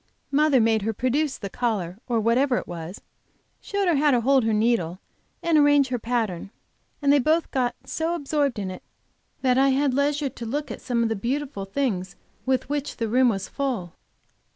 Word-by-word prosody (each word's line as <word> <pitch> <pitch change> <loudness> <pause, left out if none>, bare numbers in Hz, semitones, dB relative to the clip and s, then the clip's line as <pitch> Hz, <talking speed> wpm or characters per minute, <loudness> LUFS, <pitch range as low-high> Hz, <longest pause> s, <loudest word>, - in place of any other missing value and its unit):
Mother 290 -1 +4
made 225 -1 +3
her 220 +2 -1
produce 265 +6 0
the 200 - -5
collar, 200 -5 -2
or 235 -2 +1
whatever 245 +4 +2
it - - -3
was, 170 +2 -7 0.6
showed 400 -1 -2
her 335 -4 +3
how 295 +1 +3
to 250 -4 +3
hold 265 +1 +3
her 225 - +2
needle 210 -6 +1 0.5
and 335 -2 +4
arrange 290 -2 +4
her 250 -1 -1
pattern, 220 -6 -2 0.5
and 280 0 +5
they 290 - +5
both 315 +5 +1
got 250 -2 0
so 325 +2 -2
absorbed 285 -4 -1
in 195 -2 -3
it 185 - -8 0.6
that 255 0 +3
I 275 0 +5
had 270 0 +2
leisure 285 +1 +1
to 235 - -8
look 290 +5 -3
at - - -7
some 235 -2 0
of 230 - +1
the 225 - 0
beautiful 245 -1 -3
things 195 -5 -2 0.3
with 260 -1 +1
which 290 0 -3
the 230 - -1
room 250 +3 +4
was 195 -4 -2
full. 240 -12 -3
255 Hz, 195 wpm, -24 LUFS, 220-285 Hz, 0.6 s, and